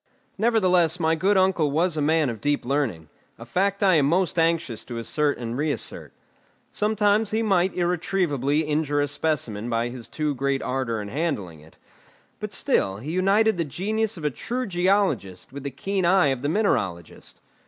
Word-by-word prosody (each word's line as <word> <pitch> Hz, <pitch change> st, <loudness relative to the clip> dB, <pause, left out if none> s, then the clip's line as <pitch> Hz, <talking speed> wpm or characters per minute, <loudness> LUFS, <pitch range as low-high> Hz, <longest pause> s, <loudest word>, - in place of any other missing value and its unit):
Nevertheless 185 Hz, -7 st, +2 dB
my 160 Hz, -1 st, +2 dB
good 190 Hz, +5 st, +2 dB
uncle 185 Hz, -5 st, +2 dB
was 165 Hz, +4 st, +1 dB
a 155 Hz, -, -1 dB
man 155 Hz, -2 st, +2 dB
of 110 Hz, -, -9 dB
deep 145 Hz, -2 st, 0 dB
learning 120 Hz, -, -1 dB, 0.3 s
a 115 Hz, -, -10 dB
fact 195 Hz, -, 0 dB
I 185 Hz, -4 st, +5 dB
am 140 Hz, -2 st, +3 dB
most 175 Hz, +1 st, +1 dB
anxious 165 Hz, -8 st, 0 dB
to 120 Hz, -, -6 dB
assert 145 Hz, +5 st, 0 dB
and 115 Hz, -1 st, -5 dB
reassert. 150 Hz, +2 st, -3 dB, 0.6 s
Sometimes 210 Hz, 0 st, +2 dB
he 220 Hz, +2 st, 0 dB
might 190 Hz, -3 st, +2 dB
irretrievably 170 Hz, -5 st, 0 dB
injure 150 Hz, -1 st, 0 dB
a 145 Hz, -, +1 dB
specimen 125 Hz, -7 st, -2 dB
by 115 Hz, 0 st, 0 dB
his 120 Hz, -2 st, -9 dB
too 150 Hz, +4 st, -2 dB
great 140 Hz, +1 st, -1 dB
ardour 120 Hz, -4 st, -2 dB
in 100 Hz, -, -7 dB
handling 105 Hz, -, -3 dB
it; 80 Hz, +1 st, -19 dB, 0.6 s
but -, -, -5 dB
still 95 Hz, 0 st, +1 dB
he 135 Hz, +9 st, -6 dB
united 195 Hz, +3 st, +2 dB
the -, -, +2 dB
genius 210 Hz, -, -2 dB
of 155 Hz, -, -7 dB
a 150 Hz, -, +1 dB
true 245 Hz, -, -4 dB
geologist 175 Hz, -, 0 dB
with 140 Hz, -, -6 dB
the 140 Hz, -, -4 dB
keen 195 Hz, +6 st, -2 dB
eye 175 Hz, -3 st, +4 dB
of 135 Hz, -2 st, -2 dB
the 145 Hz, -, -1 dB
mineralogist. 100 Hz, -, -2 dB
155 Hz, 175 wpm, -24 LUFS, 130-190 Hz, 0.6 s, I